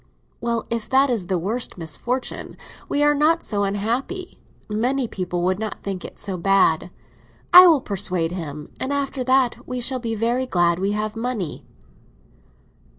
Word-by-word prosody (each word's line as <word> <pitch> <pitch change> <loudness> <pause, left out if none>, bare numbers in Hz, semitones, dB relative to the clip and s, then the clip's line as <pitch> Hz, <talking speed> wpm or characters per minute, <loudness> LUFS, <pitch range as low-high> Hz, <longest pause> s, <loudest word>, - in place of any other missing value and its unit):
"Well, 235 -1 -2
if 230 -2 -3
it 270 +1 +5
is 210 -7 -1
the 185 - 0
worst 215 +8 -3
misfortune, 210 - -3 0.3
we 290 - +1
are 295 0 +5
not 310 +3 +2
so 205 -2 -1
unhappy. 235 - -3 0.3
Many 245 +5 0
people 180 -3 -3
would 185 +2 +1
not 220 -1 -5
think 195 -2 -4
it - - -9
so 195 -2 -2
bad. 180 -2 +3 0.6
I 365 0 +11
will 315 -6 +5
persuade 185 -6 -1
him, 150 -4 -6
and 260 - -2
after 275 -2 -1
that 260 -1 +1
we 250 0 -3
shall 255 +2 0
be 230 -2 -3
very 240 +4 0
glad 175 -4 +2
we 195 +2 0
have 215 +1 -2
money." 225 -8 -4
220 Hz, 160 wpm, -22 LUFS, 185-255 Hz, 0.6 s, I